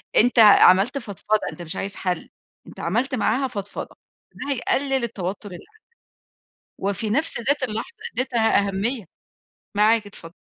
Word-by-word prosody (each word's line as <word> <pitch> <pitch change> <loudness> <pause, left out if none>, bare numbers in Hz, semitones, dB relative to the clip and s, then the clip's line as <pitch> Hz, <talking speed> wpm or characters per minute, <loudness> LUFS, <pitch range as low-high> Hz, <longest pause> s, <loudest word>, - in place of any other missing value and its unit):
أنت 245 +1 +5
عملت 205 +2 +7
فضفضة، 215 -2 -2
أنت - - -11
مش 170 +2 -6
عايز 195 +1 -4
حل، 180 -3 -3 0.4
أنت - - -12
عملت 240 +10 -1
معاها 255 +3 +1
فضفضة، 205 -5 -7 0.4
ده 285 - -4
هيقلل 270 0 0
التوتر 205 -2 -4
اللي 175 - -8
عندك، 440 - -26 1.0
وفي 200 +2 -2
نَفْس 280 +5 +1
ذات 280 +4 +1
اللحظة 260 - -4 0.2
اديتها 235 -5 +1
أهمية، 210 +4 -2 0.7
معاك 215 +1 +3
اتفضل. 170 -4 -12
220 Hz, 140 wpm, -23 LUFS, 200-260 Hz, 1.0 s, عملت